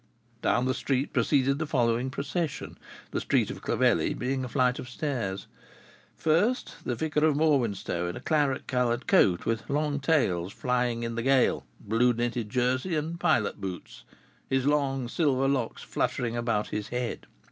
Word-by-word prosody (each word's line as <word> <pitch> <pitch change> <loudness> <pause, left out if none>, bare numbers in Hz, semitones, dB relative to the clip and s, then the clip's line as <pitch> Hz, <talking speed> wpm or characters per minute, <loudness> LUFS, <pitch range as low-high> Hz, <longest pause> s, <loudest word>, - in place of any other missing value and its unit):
Down 120 +2 +2
the 130 - +1
street 135 +1 -1
proceeded 140 +2 +2
the 155 - -2
following 120 -3 +1
procession 145 +2 -3 0.4
the - - -1
street - - +1
of - - -8
Clovelly - - +2
being 130 +1 -2
a 125 - -5
flight 125 0 +1
of 125 - -7
stairs: 120 -9 -3 0.7
First, 190 +11 +1
the 125 - -2
vicar 150 +3 0
of 155 -2 +4
Morwenstow 120 - +1
in 90 - -4
a - - -6
claret 145 -4 0
colored 125 -2 0
coat, 90 -3 +4
with 115 -1 -2
long 145 0 0
tails 100 - +1
flying 125 -2 0
in 115 0 -3
the 115 - -2
gale, 130 - +2
blue 120 +4 +2
knitted 120 -1 -2
jersey, 130 - 0
and 160 +3 -3
pilot 105 -8 +1
boots, 95 -2 -7 0.5
his 130 0 +1
long 140 -3 +1
silver 135 -1 +1
locks 130 -4 -1
fluttering 120 -1 -1
about 115 -3 -1
his 105 -1 -3
head. 125 -1 -4
130 Hz, 160 wpm, -28 LUFS, 115-145 Hz, 0.7 s, of